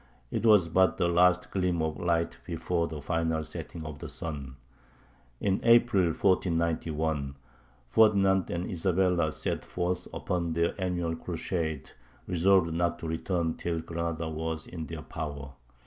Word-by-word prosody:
It 115 - 0
was 105 -6 +6
but 95 +3 +3
the 85 - +2
last 90 +1 +3
gleam 90 -3 0
of 80 -1 -2
light 85 -1 0
before 85 -2 -1
the 80 -2 -6
final 80 -1 0
setting 80 +1 -7
of 75 -1 -7
the - - -7
sun. 70 -5 -6 0.8
In 100 -1 +1
April, 115 -5 +5
1491, 80 -5 0 0.5
Ferdinand 95 - +4
and 85 +1 -2
Isabella 90 -2 +1
set - - -2
forth 90 0 -2
upon 85 -3 -2
their 85 +1 +1
annual 85 -3 -1
crusade, 80 -3 -3 0.3
resolved 90 -1 +3
not 85 +1 0
to 80 - -6
return 80 0 -1
till 85 -1 -2
Granada 85 0 -3
was 80 0 -3
in 80 -3 -7
their 80 -2 -7
power. 70 -3 -6
85 Hz, 140 wpm, -29 LUFS, 80-90 Hz, 0.8 s, was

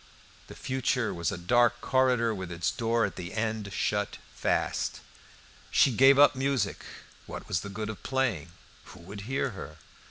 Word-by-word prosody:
The - - -11
future 130 -2 -1
was 85 +2 -1
a 100 - -4
dark 120 +7 +3
corridor, 125 -3 +2
with 95 -3 -6
its 85 -1 -1
door 115 -2 +1
at 100 - -6
the 90 +3 -6
end 110 -2 -2
shut 105 +1 -1 0.2
fast. - - -1 0.7
She 135 - +4
gave 135 +3 +7
up 145 0 +7
music. 135 -3 -1 0.4
What - - -8
was 85 - 0
the 100 - -7
good 105 +2 -4
of 105 - -11
playing? 120 - -1 0.3
Who 95 - -13
would 100 +4 -9
hear 135 -1 0
her? 80 -7 -9
110 Hz, 165 wpm, -28 LUFS, 95-130 Hz, 0.7 s, gave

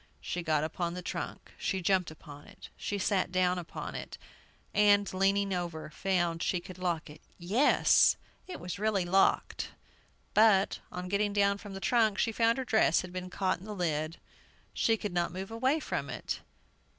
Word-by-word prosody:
She 180 - -4
got 155 -3 +1
upon 170 +2 -2
the 180 - -6
trunk; - - -5
she 190 - -1
jumped 185 -1 +2
upon 150 -2 -12
it; - - -13
she 205 - -3
sat 190 -2 0
down 180 -1 +2
upon 170 - -6
it, - - -7 0.6
and, 205 -1 +4
leaning 195 +1 +2
over, 170 -4 -4
found 175 -1 0
she 180 - 0
could 185 +1 -11
lock 175 -3 -1
it! 150 0 -13 0.2
Yes, 200 +11 +4 0.3
it 370 - -7
was 180 +1 -6
really 210 -3 +1
locked. 190 +2 +2 0.6
But, 210 -3 +4
on 180 0 -5
getting 200 +2 0
down 200 0 +2
from 200 -2 -9
the - - -5
trunk, 220 -1 +2
she 225 - +1
found 230 +2 +2
her 265 - -2
dress 220 -8 +3
had 180 -1 -9
been 185 0 -5
caught 185 -1 -1
in 185 - -12
the 210 -1 -6
lid; 160 -3 -1 0.6
she 225 -1 +2
could 205 -3 -4
not 175 -1 0
move 190 +3 -6
away 260 +7 +1
from - - -3
it! - - -4
185 Hz, 180 wpm, -30 LUFS, 175-205 Hz, 0.6 s, and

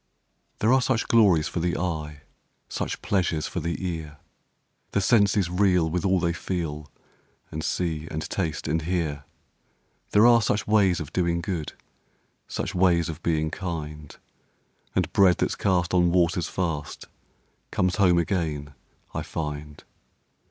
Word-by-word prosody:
There 110 +4 +4
are 130 - +4
such 125 -2 0
glories 100 -9 +4
for - - -3
the 85 +1 0
eye, 75 -4 -3 0.5
Such - - -4
pleasures 90 -5 0
for 90 - -3
the 85 +3 -3
ear, 80 -3 -5 0.8
The - - +3
senses 100 -2 +3
reel 90 -2 +2
with 90 0 -1
all 95 -1 +3
they 85 0 0
feel 80 -5 -4 0.6
And 80 0 -4
see 80 -3 -2
and 80 0 -4
taste 80 -8 -3
and 80 +2 0
hear; 80 -4 -2 0.8
There 105 +2 +5
are 120 -1 +7
such 105 0 0
ways 100 -4 +3
of 80 -1 -7
doing 85 -2 +1
good, 85 -3 -4 0.7
Such - - -4
ways 85 -2 +3
of 80 - -6
being 80 -2 0
kind, 75 -5 -6 0.8
And - - 0
bread 95 -3 +5
that's - - 0
cast 90 -3 +1
on 90 -1 +4
waters 85 0 +2
fast 80 -5 -3 0.6
Comes 90 0 0
home 90 -4 +4
again, 80 -5 -1 0.4
I - - -2
find. 75 -1 -6
85 Hz, 145 wpm, -25 LUFS, 80-95 Hz, 0.8 s, are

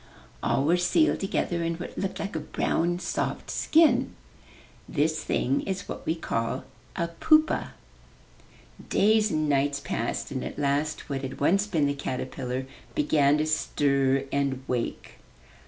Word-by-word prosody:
All 135 - +1
were 170 +5 +3
sealed 180 - +3
together 175 -3 -1
in 165 0 -1
what 175 +1 -7
looked 195 -1 -3
like 200 -3 -4
a - - 0
brown, 170 +3 0
soft 180 - -3
skin. 320 0 +3 0.7
This 155 +1 0
thing 135 -1 0
was 190 0 -3
what - - -7
we 160 - +1
call 115 -5 -2 0.3
a 170 0 -1
pupa. 310 - +3 1.2
Days 215 +1 +4
and 155 -4 0
nights 140 0 +1
passed 115 - -3
and 130 -2 -3
at - - -6
last 145 +1 -1
what 135 -2 -3
had 135 0 -6
once 195 +8 +3
been 160 -7 +1
the 140 - +1
caterpillar 130 -1 -4 0.3
began 150 -1 +3
to 155 - +1
stir 140 -3 +1
and 140 -2 0
wake. 125 -2 -3
150 Hz, 145 wpm, -27 LUFS, 140-175 Hz, 1.2 s, Days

